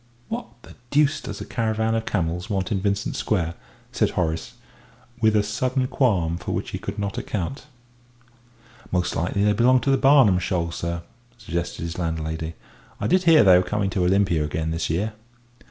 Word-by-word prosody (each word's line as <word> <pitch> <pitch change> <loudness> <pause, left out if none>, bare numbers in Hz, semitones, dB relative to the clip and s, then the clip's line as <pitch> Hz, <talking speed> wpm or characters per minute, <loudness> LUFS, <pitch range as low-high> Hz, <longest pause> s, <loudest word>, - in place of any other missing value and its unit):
"What 235 +2 -4 0.2
the - - -13 0.2
deuce 145 +1 +2
does - - -7
a - - -5
caravan 110 -1 0
of 115 0 -1
camels 90 +2 -2
want 95 -1 -1
in 100 -3 0
Vincent 100 0 -1
Square?" 85 -6 0 0.4
said - - +1
Horace, 80 -2 -2 0.7
with 110 -1 +4
a 105 - +4
sudden 130 +5 -1
qualm 95 - +1
for - - -4
which - - -3
he - - -4
could - - -6
not 100 -1 -2
account. 110 - -4 1.2
"Most 90 -1 0
likely 95 +4 0
they 105 0 +4
belong 125 +5 +4
to 135 - +1
the 135 - +4
Barnum 130 -8 +5
Show, 85 -2 -1
sir," 85 0 -4 0.3
suggested 85 -7 -4
his 85 +1 -5
landlady. 80 -1 -3 0.4
"I - - -3
did 185 0 +2
hear 165 -5 +7
they 95 -3 +7
were - - +1
coming 100 +1 -1
to 95 -1 0
Olympia 90 -3 +2
again 80 +2 -2
this 80 +1 -2
year." 100 +7 -1
100 Hz, 180 wpm, -24 LUFS, 85-115 Hz, 1.2 s, hear